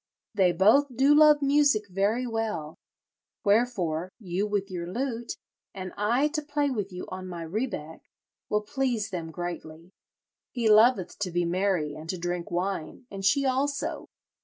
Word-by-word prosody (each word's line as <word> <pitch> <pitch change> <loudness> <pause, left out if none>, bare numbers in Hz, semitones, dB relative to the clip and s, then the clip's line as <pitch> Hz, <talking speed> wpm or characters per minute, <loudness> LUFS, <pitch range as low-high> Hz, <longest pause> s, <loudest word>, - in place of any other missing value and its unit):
They 190 -4 +4
both 210 +11 +4
do 275 +3 +5
love 300 -1 +6
music 280 -7 +3
very 200 +6 0
well; 220 -10 -3 0.7
wherefore, 195 -6 +1
you 195 0 -2
with 200 -1 -2
your 175 -1 -5
lute, 240 0 -3 0.4
and 185 -1 -6
I 235 +8 +2
to 305 0 -2
play 290 -1 -1
with 205 -5 -3
you 180 0 -6
on 185 0 -6
my 175 -2 -6
rebeck, 165 -4 -4 0.5
will 210 0 +1
please 230 -2 -1
them 170 -3 -4
greatly. 170 0 -7 0.6
He 240 -3 -1
loveth 215 -2 +4
to 200 -3 -1
be 175 0 0
merry 175 -4 0
and 155 +2 -10
to 185 - -2
drink 175 0 -3
wine, 180 +2 -3
and 195 -1 -6
she 275 +8 +3
also. 275 +2 -1
200 Hz, 155 wpm, -27 LUFS, 175-250 Hz, 0.7 s, love